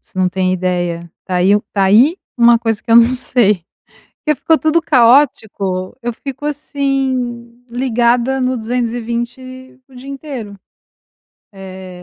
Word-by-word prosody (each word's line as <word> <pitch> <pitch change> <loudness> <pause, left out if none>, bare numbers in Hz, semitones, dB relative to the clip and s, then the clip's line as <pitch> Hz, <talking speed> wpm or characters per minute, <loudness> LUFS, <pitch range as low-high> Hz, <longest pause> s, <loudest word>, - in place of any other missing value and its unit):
Você - - -13
não 185 -1 +2
tem 185 0 -1
ideia, 175 -2 -2
tá 185 - -2
aí 190 +3 +4
tá 195 -1 +1
aí 235 - +4 0.2
uma 235 -1 +5
coisa 225 -2 -2
que - - -8
eu 230 - +7
não 235 +2 +5
sei 215 -8 +1 0.6
que 300 -1 +2
ficou 315 +4 +1
tudo 315 +1 +2
caótico, 230 - +2
eu 240 0 -2
fico 275 +4 -8
assim, 265 -5 -3
ligada 245 +1 +1
no 255 0 0
220 240 +2 -4
o 260 - -18
dia 260 +2 -10
inteiro. 270 -7 -7 1.0
Eh, 190 -1 -10
240 Hz, 140 wpm, -16 LUFS, 200-260 Hz, 1.0 s, eu